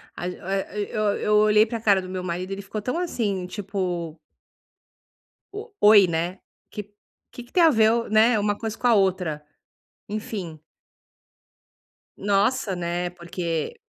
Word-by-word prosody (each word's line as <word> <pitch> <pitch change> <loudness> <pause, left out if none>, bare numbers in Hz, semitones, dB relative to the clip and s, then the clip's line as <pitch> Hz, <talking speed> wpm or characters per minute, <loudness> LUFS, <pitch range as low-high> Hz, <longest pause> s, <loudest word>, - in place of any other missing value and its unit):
a 175 - -4
eh 195 +2 -4
eu 215 - -1 0.2
eu 210 - +1
olhei 210 0 +5
pra 225 0 -5
cara 200 -3 +4
do 185 - -9
meu 185 -1 -4
marido, 180 +2 -4
ele 195 0 -4
ficou 205 +2 -6
tão, 250 +9 -2
assim, 205 - -2
tipo 180 -5 -4 1.3
O 430 +3 -8
oi, 205 -2 +8
né, 170 +3 -2 0.3
que 205 -1 -8 0.4
que 245 0 -11
tem 350 - +4
a 325 - +8
ver, 230 -3 +3
né, 220 +1 +4
uma 205 0 0
coisa 225 0 -5
com 245 - 0
a 240 - +5
outra, 180 -6 0 0.6
enfim. 200 -6 -5 1.6
Nossa, 200 +1 +1
né, 175 0 -2
porque, 170 - -4
200 Hz, 140 wpm, -24 LUFS, 180-220 Hz, 1.6 s, oi